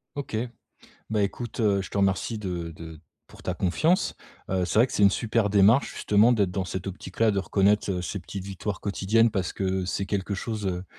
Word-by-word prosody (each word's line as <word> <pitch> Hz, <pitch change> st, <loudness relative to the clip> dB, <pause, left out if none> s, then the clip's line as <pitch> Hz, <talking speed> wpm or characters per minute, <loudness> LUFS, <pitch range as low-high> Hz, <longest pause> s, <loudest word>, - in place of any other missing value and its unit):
OK. 140 Hz, -6 st, -4 dB, 0.8 s
Beh, 105 Hz, -2 st, +2 dB
écoute, 120 Hz, +3 st, -5 dB
heu, 100 Hz, -3 st, +2 dB
je -, -, -9 dB
te 100 Hz, -, -3 dB
remercie 100 Hz, +3 st, +1 dB
de 90 Hz, -4 st, -4 dB
de 80 Hz, -1 st, -10 dB, 0.3 s
pour -, -, -16 dB
ta 90 Hz, -, -2 dB
confiance. 155 Hz, -, +1 dB, 0.4 s
Heu, 95 Hz, -1 st, +1 dB
c'est 95 Hz, -, 0 dB
vrai 120 Hz, -, +6 dB
que -, -, -11 dB
c'est 105 Hz, -, +1 dB
une 100 Hz, -, +7 dB
super 110 Hz, -1 st, 0 dB
démarche, 105 Hz, +6 st, +4 dB
justement, 105 Hz, +4 st, +4 dB
d'être 100 Hz, -5 st, +2 dB
dans 95 Hz, 0 st, -2 dB
cette 95 Hz, +1 st, -5 dB
optique-là, 105 Hz, +3 st, -1 dB
de 100 Hz, -, 0 dB
reconnaître, 100 Hz, +1 st, +2 dB
heu, 90 Hz, -1 st, -2 dB
ces 100 Hz, +3 st, -4 dB
petites 95 Hz, +2 st, -7 dB
victoires 100 Hz, 0 st, -4 dB
quotidiennes, 110 Hz, +3 st, +2 dB
parce 95 Hz, -4 st, -2 dB
que 95 Hz, -1 st, -1 dB
c'est 95 Hz, +2 st, -2 dB
quelque 100 Hz, 0 st, -2 dB
chose, 105 Hz, 0 st, -4 dB
heu, 90 Hz, 0 st, -2 dB
100 Hz, 210 wpm, -26 LUFS, 95-110 Hz, 0.8 s, une